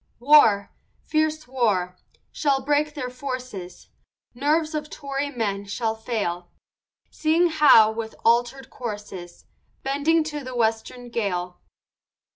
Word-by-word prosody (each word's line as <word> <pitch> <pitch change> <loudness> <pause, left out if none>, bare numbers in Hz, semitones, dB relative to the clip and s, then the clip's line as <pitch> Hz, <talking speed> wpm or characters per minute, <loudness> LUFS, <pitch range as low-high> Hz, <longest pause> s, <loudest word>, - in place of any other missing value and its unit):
War, 235 -7 +5 0.3
fierce 310 -1 -1
war, 205 -8 0 0.4
shall 280 -3 +1
break 295 +1 +1
their 255 -4 -4
forces, 250 -8 -7 0.4
Nerves 305 +5 0
of 300 0 -4
Tory 280 -1 -4
men 205 -6 -3
shall 220 +3 -2
fail, 210 -6 -3 0.6
Seeing 330 +3 +2
Howe, 275 -9 +6
with 220 0 -6
alter'd 245 +3 +1
courses, 205 -7 -8 0.4
Bending 290 +4 +2
to 300 -2 -5
the 255 -1 -7
western 235 +2 -1
gale. 180 -6 -3
250 Hz, 110 wpm, -24 LUFS, 215-295 Hz, 0.6 s, Howe